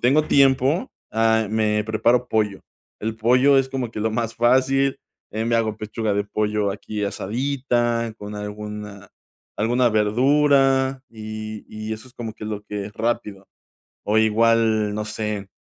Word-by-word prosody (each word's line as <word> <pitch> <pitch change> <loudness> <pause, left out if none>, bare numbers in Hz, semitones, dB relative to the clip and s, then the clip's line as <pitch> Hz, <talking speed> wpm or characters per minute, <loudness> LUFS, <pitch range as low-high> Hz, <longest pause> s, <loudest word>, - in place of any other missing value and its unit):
tengo 140 +5 +3
tiempo, 135 - +3 0.2
ah, 110 0 +2
me 105 -1 +1
preparo 120 +3 +2
pollo, 105 -3 0 0.4
el 110 +1 -3
pollo 125 +5 +4
es 130 0 +1
como 130 -3 -3
que 110 - -6
lo 110 +1 0
más 115 +1 -2
fácil, 130 +3 +3 0.3
eh, 110 +1 -2
me 115 0 +2
hago 110 -2 0
pechuga 110 0 -3
de 100 0 0
pollo 105 0 -1
aquí 105 +1 -4
asadita 120 +1 -1
con 105 0 -7
alguna 105 -1 -7 0.5
alguna 120 +3 +2
verdura 135 +4 +3
y 110 -1 -7
y 110 0 -6
eso 110 +4 -12
es 125 - -20
como 115 -2 -6
que 110 - -9
lo 105 -1 -4
que 105 -1 -5
es 105 - -11
rápido 110 -4 -3 0.6
o 105 +1 +2
igual, 110 -1 +3
no 105 - -2
sé. 105 -2 -4
110 Hz, 155 wpm, -22 LUFS, 105-125 Hz, 0.6 s, pollo